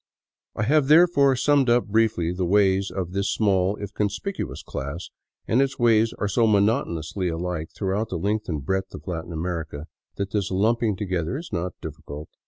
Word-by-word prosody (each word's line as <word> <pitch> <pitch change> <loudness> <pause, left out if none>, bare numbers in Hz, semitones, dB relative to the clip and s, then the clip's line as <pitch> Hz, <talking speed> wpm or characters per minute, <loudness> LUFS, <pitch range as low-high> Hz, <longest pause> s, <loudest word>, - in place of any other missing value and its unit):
I 105 - -1
have, 145 +4 +3
therefore, 150 -4 +5
summed 140 0 +3
up 120 +1 +3
briefly 105 -6 +1
the 90 +1 -2
ways 95 +1 +3
of 90 -1 -4
this 100 +1 -1
small, 100 -2 +2
if 100 -1 -7
conspicuous, 105 - -3
class, 70 +6 -6 0.4
and 120 +4 +3
its 135 -1 0
ways 115 -1 +4
are 105 - -1
so 115 +3 +2
monotonously 100 - +1
alike 85 -1 -3
throughout 100 +3 -1
the 90 - -3
length 105 +4 -1
and 75 -5 -3
breadth 95 +3 -2
of - - -11
Latin 85 -2 -5
Amer 85 0 -2
ica 75 -1 -9 0.3
that 100 0 -3
this 100 -2 -1
lumping 110 +2 +1
together 95 +1 -2
is 165 -5 -9
not 90 0 -2
difficult. 75 +2 -8
100 Hz, 180 wpm, -24 LUFS, 90-115 Hz, 0.4 s, therefore